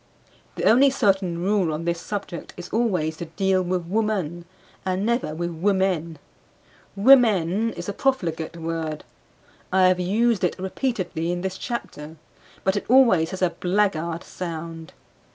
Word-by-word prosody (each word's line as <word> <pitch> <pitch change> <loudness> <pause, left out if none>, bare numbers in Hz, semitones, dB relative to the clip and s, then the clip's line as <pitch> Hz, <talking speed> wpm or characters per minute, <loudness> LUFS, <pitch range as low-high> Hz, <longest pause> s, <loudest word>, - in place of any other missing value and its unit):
The - - -4
only 265 +5 +6
certain 190 -8 +1
rule 195 -4 +1
on 155 +2 -4
this 170 0 -1
subject 200 -3 -6
is 175 -1 -8
always 185 -9 0
to 170 - -5
deal 190 +3 +1
with 180 -1 -2
woman 185 -4 -1 0.4
and 190 +1 -1
never 235 -9 0
with 170 +1 -3
women. 175 -2 0 0.8
"Women" 215 -3 +4
is 175 0 -7
a 200 - -2
profligate 170 -11 -1
word; 160 -2 -4 0.7
I 185 0 +5
have 185 0 +1
used 215 +4 +1
it 180 - 0
repeatedly 185 -4 -2
in 175 0 -2
this 190 0 -3
chapter; 160 -10 -6 0.5
but 190 +1 +1
it 205 - -2
always 230 -11 +5
has 190 -1 -4
a 180 - +3
blackguard 175 -2 0
sound. 165 0 -7
185 Hz, 145 wpm, -24 LUFS, 170-205 Hz, 0.8 s, only